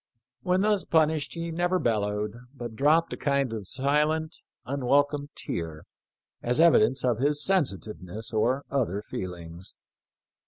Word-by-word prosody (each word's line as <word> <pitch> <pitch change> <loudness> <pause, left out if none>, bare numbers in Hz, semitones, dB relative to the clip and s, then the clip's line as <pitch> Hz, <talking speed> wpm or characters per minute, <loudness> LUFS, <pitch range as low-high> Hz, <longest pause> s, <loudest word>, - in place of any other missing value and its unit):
When 180 +6 +2
thus 210 -2 +2
punished 155 -1 +1
he 170 0 -4
never 175 +2 +1
bellowed, 105 - 0 0.2
but 120 -3 -7
dropped 155 +6 +3
a - - -5
kind 140 -4 0
of 105 -4 -5
silent, 150 - +1 0.3
unwelcome 140 +3 +1
tear 80 -2 -4 0.6
as 125 +3 0
evidence 135 -6 +5
of 120 -3 +1
his 145 +2 +1
sensitiveness 110 - -1
or 120 +6 +1
other 110 -7 0
feelings." 85 -2 -6
135 Hz, 125 wpm, -27 LUFS, 105-155 Hz, 0.6 s, evidence